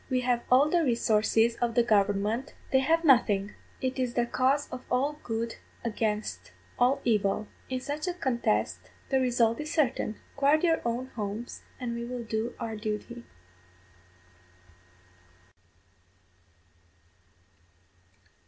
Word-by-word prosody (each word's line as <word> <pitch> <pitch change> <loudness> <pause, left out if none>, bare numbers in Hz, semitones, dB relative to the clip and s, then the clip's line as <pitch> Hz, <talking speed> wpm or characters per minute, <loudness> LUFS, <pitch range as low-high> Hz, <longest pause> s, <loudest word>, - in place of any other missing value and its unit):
We 255 -1 +1
have 245 -1 +1
all 260 +4 +6
the 340 +2 +2
resources 230 -2 +2
of 235 -1 -1
the 240 - +5
government, 210 +3 +1 0.2
they 265 - +5
have 325 +5 +2
nothing; 215 -7 +4 0.3
it 260 0 -2
is 250 -2 -1
the 240 - +2
cause 265 +4 +1
of 255 0 -6
all 280 +4 0
good 230 0 -3 0.3
against 215 -2 -2 0.3
all 250 +3 +3
evil. 210 -2 +1 0.2
In 255 -1 -2
such 290 +5 -4
a 355 - -1
contest 110 - -1 0.2
the 265 - +3
result 240 -2 +2
is 305 +1 -4
certain. 270 -8 +1 0.2
Guard 285 +3 +3
your 330 -2 +3
own 240 +2 -2
homes, 215 +2 -5 0.2
and 245 -2 -3
we 235 0 -4
will 245 0 -5
do 220 +1 -3
our 225 -2 -4
duty. 215 +3 -5
240 Hz, 125 wpm, -28 LUFS, 220-265 Hz, 0.3 s, all